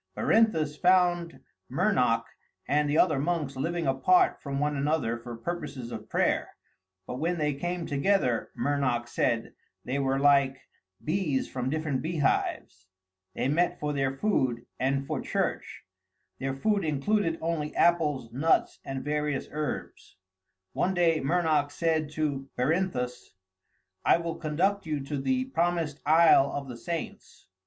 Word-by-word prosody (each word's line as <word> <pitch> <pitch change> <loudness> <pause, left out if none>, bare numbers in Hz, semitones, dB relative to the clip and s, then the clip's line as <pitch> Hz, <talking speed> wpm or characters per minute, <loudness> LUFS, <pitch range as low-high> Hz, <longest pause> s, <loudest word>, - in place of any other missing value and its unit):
Berinthus 160 -10 +2
found 175 -2 +2 0.3
Mernoc 130 - +2 0.4
and 150 +1 +2
the 150 - +1
other 155 -6 +4
monks 150 -3 -1
living 165 +5 -2
apart 135 +7 +3
from 140 -1 -3
one 150 0 0
another 140 -4 0
for 120 0 -8
purposes 140 -3 -5
of - - -7
prayer, - - 0 0.5
but 125 - -5
when 170 +3 0
they 150 -2 0
came 175 +4 -3
together, 140 - +1
Mernoc 125 -3 0
said, 115 -1 -1 0.3
they 135 +3 -1
were 135 -1 +1
like 140 -1 +3 0.4
bees 155 -5 0
from 125 0 -3
different 150 -3 -1
beehives. 145 - -1 0.5
They - - 0
met 175 +5 +1
for 150 0 -2
their 135 -1 -1
food 130 - 0
and 135 +1 0
for 150 -1 -3
church; - - -3 0.6
their 135 0 -2
food 205 +8 +1
included 165 +4 0
only 160 -2 -2
apples, 150 -8 +2
nuts, 150 +6 +1
and 135 -1 -5
various 150 -1 -1
herbs. 150 -9 -5 0.6
One 190 +1 0
day 165 -2 +3
Mernoc 155 -1 +1
said 160 0 0
to 140 -3 -2
Berinthus, 125 - -1 0.7
"I - - +5
will 170 -1 -4
conduct 175 +5 0
you 150 -2 -2
to 140 +2 -4
the 260 - 0
Promised 170 - -1
Isle 155 -3 +6
of 140 -1 -4
the 120 - -7
Saints." 165 +7 -6
150 Hz, 140 wpm, -28 LUFS, 135-170 Hz, 0.7 s, Isle